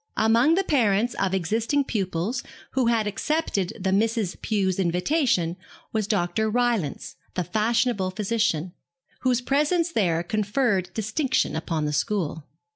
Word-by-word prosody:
Among 230 +8 +4
the 390 - +2
parents 235 - +2
of 195 -1 +1
existing 225 - +1
pupils 200 +1 -2 0.3
who 260 -3 +1
had 230 -2 +2
accepted 210 - -1
the 190 0 0
Misses 220 -1 +1
Pew's 195 -4 0
invitation 180 - +1 0.4
was 215 -2 0
Dr. 210 +2 0
Rylance, 230 - -1 0.2
the 180 - 0
fashionable 220 0 +1
physician, 190 -4 -1 0.5
whose 255 -1 +1
presence 300 +6 +1
there 175 - +1
conferred 210 -1 0
distinction 220 - 0
upon 160 -1 -2
the 150 - -1
school. 160 -1 -1
215 Hz, 125 wpm, -25 LUFS, 185-240 Hz, 0.5 s, Among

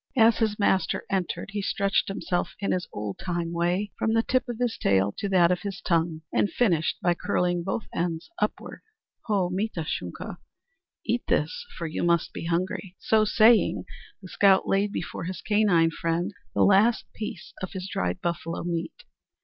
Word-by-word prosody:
As 225 -1 +5
his 215 -2 +1
master 190 -2 +1
entered 185 0 -2
he 205 0 -2
stretched 195 0 +1
himself 185 -2 -2
in 200 - -1
his 180 -2 -1
old 105 -1 -5
time 170 -2 -3
way, 175 +4 0
from 220 0 +1
the 225 - +3
tip 255 0 0
of 240 - -3
his 245 -1 0
tail 95 +1 +2
to 200 - -2
that 180 -2 +5
of 180 -1 0
his 195 -1 -5
tongue, 165 -2 0
and 205 - +2
finished 175 -10 +1
by 175 - +4
curling 175 0 0
both 195 +4 -2
ends 170 - -2
upward. - - -3 0.4
"Ho, 195 -5 +1
mita 190 -1 -2
Shunka, - - -5 0.7
eat - - 0
this; 485 -1 0
for 170 - -4
you 160 - -3
must 170 -1 +1
be - - -6
hungry!" 180 +2 -2
So 215 -1 +3
saying, 220 +2 +4 0.4
the - - -8
scout 195 +1 +4
laid 200 +1 +2
before 170 -3 -4
his 185 +1 -4
canine 200 -6 +3
friend 170 +5 -1 0.2
the - - +4
last 205 +4 +4
piece 210 -5 -7
of 185 - -5
his 190 -1 -5
dried 195 -2 -2
buffalo 170 -1 -3
meat. 170 -1 -4
185 Hz, 175 wpm, -26 LUFS, 170-210 Hz, 0.7 s, As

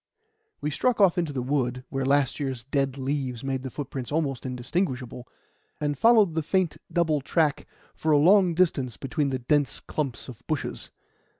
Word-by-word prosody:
We 150 - -1
struck 245 - +1
off 190 -3 +5
into 165 -4 -1
the 130 -3 -3
wood, 125 -2 -1
where 135 0 -2
last 140 0 +2
year's 135 -4 -3
dead 135 0 -1
leaves 130 -3 -3
made 135 -1 -2
the 130 - -5
footprints 130 -1 -6
almost 140 -5 -1
indistinguishable, 125 -1 -3 0.5
and 145 -1 -1
followed 215 - +5
the 160 - 0
faint 180 +1 0 0.2
double 160 -4 +1
track 150 +1 0 0.3
for 160 - -1
a 150 - +6
long 180 +3 +5
distance 145 -9 +1
between 140 +1 -1
the 130 - -1
dense 145 +3 +1
clumps 140 -6 -4
of 125 -3 -10
bushes. 155 -3 -3
145 Hz, 170 wpm, -26 LUFS, 130-160 Hz, 0.5 s, a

